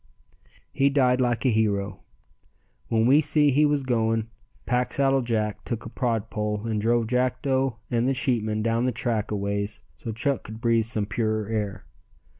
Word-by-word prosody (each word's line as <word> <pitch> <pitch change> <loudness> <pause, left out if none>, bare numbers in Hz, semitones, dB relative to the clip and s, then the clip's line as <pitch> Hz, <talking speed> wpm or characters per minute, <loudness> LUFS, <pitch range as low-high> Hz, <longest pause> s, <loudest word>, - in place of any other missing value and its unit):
He 140 +1 +3
died 130 -2 +3
like 120 0 0
a - - +5
hero. 100 -3 0 0.9
When 110 -1 +2
we 140 +5 +6
see 150 -1 +3
he 150 +3 +4
was 145 -1 0
going, 115 -3 0 0.3
Packsaddle 135 +2 +1
Jack 105 -3 -1
took 115 +1 -4
a - - -6
prod 115 -5 -2
pole 105 0 -2
and 110 -2 -1
drove 115 +1 +2
Jackdo 130 +1 0 0.2
and 120 +1 +1
the 135 - +1
sheepmen 110 -5 0
down 115 +2 +1
the 130 - +1
track 115 -2 -2
a 105 - -1
ways 100 +1 -3 0.2
so 115 - -7
Chuck 120 +4 -1
could 110 +1 -8
breathe 115 -1 +2
some 110 -2 -2
purer 110 -1 -1
air. 105 -3 -3
115 Hz, 170 wpm, -25 LUFS, 110-130 Hz, 0.9 s, we